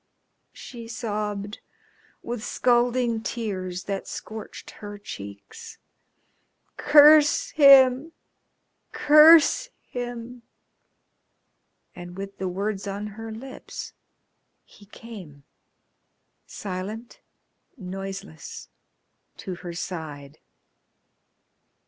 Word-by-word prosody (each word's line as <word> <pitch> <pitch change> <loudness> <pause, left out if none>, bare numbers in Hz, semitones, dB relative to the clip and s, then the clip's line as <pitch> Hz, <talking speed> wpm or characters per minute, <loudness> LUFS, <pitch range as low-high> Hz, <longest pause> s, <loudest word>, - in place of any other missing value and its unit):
she 235 -3 -10
sobbed, 210 -3 -4 0.6
with 235 -2 -5
scalding 240 -1 +1
tears 185 -6 -4
that 195 +1 -4
scorched 220 -1 -8
her 205 0 -8
cheeks. 205 - -10 1.0
"Curse 295 0 +6
him! 275 0 +6 0.8
Curse 310 +10 +6
him!" 245 0 -7 1.5
And 175 0 -10
with 195 0 -8
the 190 - -2
words 200 +2 -3
on 200 +2 -4
her 225 +1 -8
lips 260 +4 -9 0.7
he 205 - -19
came, 190 -11 -12 1.0
silent, 205 +4 -7 0.6
noiseless, 195 -4 -8 0.7
to 195 -4 -6
her 175 -1 -8
side. 155 -4 -7
215 Hz, 75 wpm, -25 LUFS, 190-245 Hz, 1.5 s, Curse